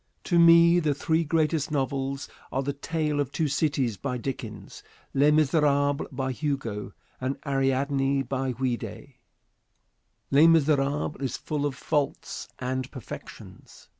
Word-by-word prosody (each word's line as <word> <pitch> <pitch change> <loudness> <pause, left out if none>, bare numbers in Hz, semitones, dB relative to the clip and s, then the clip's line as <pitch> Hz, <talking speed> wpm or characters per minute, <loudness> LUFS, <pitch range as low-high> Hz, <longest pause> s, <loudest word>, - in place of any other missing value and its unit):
To 175 -2 +2
me 170 +1 +7
the 150 -4 0
three 160 +3 +1
greatest 160 -1 +1
novels 135 -1 -2 0.2
are 135 - -1
"The 140 +1 -2
Tale 150 +1 -2
of 140 -2 -1
Two 160 0 0
Cities," 140 -6 0
by 125 +6 -3
Dickens, 110 -6 -6 0.3
"Les 140 +2 +4
Miserables," 145 -2 +2
by 130 -1 -2
Hugo, 125 -8 -3 0.3
and 130 +2 -2
"Ariadne," 135 0 +1
by 130 +1 -2
Ouida. 120 -2 -3 1.3
"Les 145 +4 +7
Miserables" 150 -2 +2
is 130 -3 -2
full 145 -1 -2
of 140 - -5
faults 145 +1 -2
and 130 0 -3
perfections. 130 -6 -11
140 Hz, 130 wpm, -26 LUFS, 130-150 Hz, 1.3 s, me